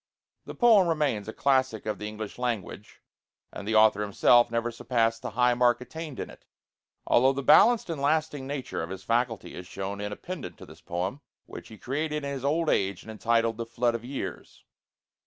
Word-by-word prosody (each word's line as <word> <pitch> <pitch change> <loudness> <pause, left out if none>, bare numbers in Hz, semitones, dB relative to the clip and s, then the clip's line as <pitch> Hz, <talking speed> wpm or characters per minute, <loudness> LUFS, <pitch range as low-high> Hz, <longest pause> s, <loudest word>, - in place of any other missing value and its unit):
The - - -8
poem 220 -7 +5
remains 145 -11 0
a - - -4
classic 130 -5 +1
of 110 - -3
the 105 - -5
English 105 +1 -7
language, 120 -6 -4 0.5
and 100 - -7
the 110 - 0
author 110 -1 +5
himself 120 +4 +4
never 115 0 -1
surpassed 115 -1 0
the - - -4
high 125 0 +4
mark 120 0 +3
attained 155 +2 -8
in - - -4
it; - - -17 0.6
although 130 +3 +4
the 140 +1 -4
balanced 235 - +6
and 165 -5 -4
lasting 145 -2 0
nature 140 -2 -4
of 80 - -5
his 95 0 -7
faculty 115 -4 -1
is 90 0 -9
shown 100 +2 -5
in 105 0 -4
a - - -4
pendant 180 - -7
to - - -11
this - - -15
poem, 95 +10 -4 0.2
which - - -10
he 110 - -12
created 150 +5 -3
in 140 - -3
his 135 -2 -6
old 160 +4 +1
age 95 -8 0
and 110 - -9
entitled 115 +1 +1
'The 115 - -4
Flood 120 +1 0
of 115 0 -4
Years.' 135 +3 -7
120 Hz, 200 wpm, -27 LUFS, 110-140 Hz, 0.6 s, balanced